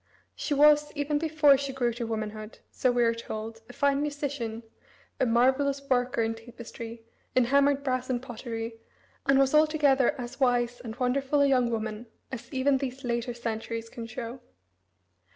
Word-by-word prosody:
She 290 - -2
was, 295 +1 +5
even 290 0 0
before 310 -3 +4
she 275 -1 -3
grew 245 -3 0
to 235 0 -4
womanhood, 215 -1 -5
so 255 - +1
we 245 0 +2
are 230 0 +3
told, 225 -1 -6
a - - -10
fine 280 +1 +2
musician, 285 -6 -3 0.6
a 260 - +2
marvellous 265 +4 +3
worker 245 -2 +2
in 225 0 0
tapestry, 230 0 -9 0.3
in 255 - +5
hammered 280 +2 +3
brass 255 -1 -1
and 250 -1 0
pottery, 230 -2 -6 0.5
and 275 0 +5
was 270 0 +3
altogether 300 -5 +3
as 245 +2 -7
wise 245 -2 +2
and 225 -2 -6
wonderful 270 +3 +1
a 280 - +5
young 250 -3 +3
woman 220 0 -3 0.2
as 260 -3 -7
even 270 0 +2
these 270 0 -5
later 240 0 -2
centuries 230 -1 -4
can 230 -1 -7
show. 235 +2 -6
250 Hz, 165 wpm, -28 LUFS, 230-275 Hz, 0.6 s, was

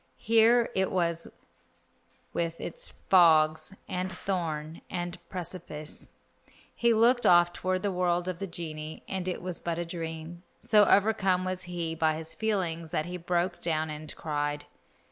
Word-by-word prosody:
Here 230 +1 +4
it 190 0 +2
was 170 -2 0 1.1
with 165 -1 -2
its - - -5
fogs, 160 -1 +4
and 185 +1 -2
thorn, 165 -4 -3
and 175 0 -4
precipice. 170 -4 -5 0.6
He 235 -1 +2
looked 235 +2 +4
off 175 0 +6
toward 185 +1 -1
the 200 - +1
world 180 -1 0
of 180 -2 -3
the 195 - -3
genii, 160 -3 -6
and 190 -1 -3
it 180 - -3
was 180 -2 -3
but 170 -1 -3
a 175 - -2
dream. 165 0 -6 0.2
So 210 -1 +5
overcome 195 -3 +3
was 185 0 -2
he 170 -2 -2
by 160 -1 +1
his 160 0 -1
feelings 175 -7 -1
that 155 - -1
he 180 +1 -5
broke 175 +1 -1
down 155 -2 0
and 150 0 -8
cried. 145 -1 -2
175 Hz, 150 wpm, -29 LUFS, 160-185 Hz, 1.1 s, off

